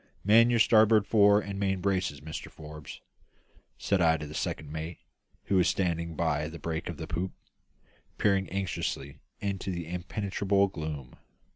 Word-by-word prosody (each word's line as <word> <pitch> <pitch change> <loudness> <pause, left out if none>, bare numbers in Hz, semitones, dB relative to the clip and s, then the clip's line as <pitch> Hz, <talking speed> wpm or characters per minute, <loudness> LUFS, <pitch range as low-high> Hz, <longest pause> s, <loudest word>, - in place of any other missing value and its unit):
"Man 115 +4 +6
your 120 - +3
starboard 110 -1 +5
fore 105 -1 +5
and 100 -1 -5
main 95 -1 0
braces, 90 -7 -1
Mr 80 +1 -7
Forbes," 75 -1 -10 0.8
said 100 -2 +1
I 80 -1 +4
to 75 - -6
the 75 - -8
second 75 -1 -3
mate, 80 +2 -5 0.5
who 95 - +1
was 90 -1 +4
standing 85 -3 -1
by 75 -2 0
the 80 +1 -8
break 80 0 -4
of 85 - -5
the 80 - -5
poop, 90 +4 -3 0.8
peering 100 -2 +2
anxiously 85 -7 -3 0.2
into 100 -1 -3
the 85 -2 -4
impenetrable 100 +2 0
gloom. 75 -7 -6
90 Hz, 155 wpm, -29 LUFS, 80-100 Hz, 0.8 s, Man